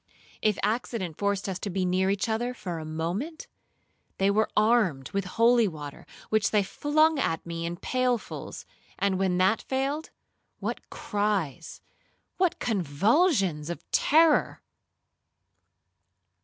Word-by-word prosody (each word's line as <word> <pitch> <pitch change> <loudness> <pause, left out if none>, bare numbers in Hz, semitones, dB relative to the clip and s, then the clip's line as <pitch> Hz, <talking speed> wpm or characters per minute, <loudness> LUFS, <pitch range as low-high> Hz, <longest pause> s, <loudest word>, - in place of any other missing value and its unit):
If 215 -2 +2
accident 210 -5 -2
forced 200 -1 0
us 190 -2 -3
to 205 - -4
be 190 0 -1
near 185 +1 +1
each 200 +3 0
other 240 +3 -1
for 180 -7 -5
a 155 - -7
moment, 175 - -4 0.7
they 195 +1 +3
were 215 +2 +2
armed 210 - +2
with 200 -1 -1
holy 230 +4 +4
water, 150 -5 -8 0.2
which 215 -1 +2
they 210 -2 +3
flung 305 +7 +2
at 165 -10 -1
me 170 0 -4
in 170 +1 -5
pailfuls; 250 +3 -2 0.3
and 195 -2 0
when 185 -2 +1
that 190 +4 +3
failed, 275 +4 -2 0.5
what - - -5
cries,—what 205 - -3
convulsions 195 - +1
of 170 - -6
terror! 315 0 +3
200 Hz, 125 wpm, -27 LUFS, 180-240 Hz, 0.7 s, holy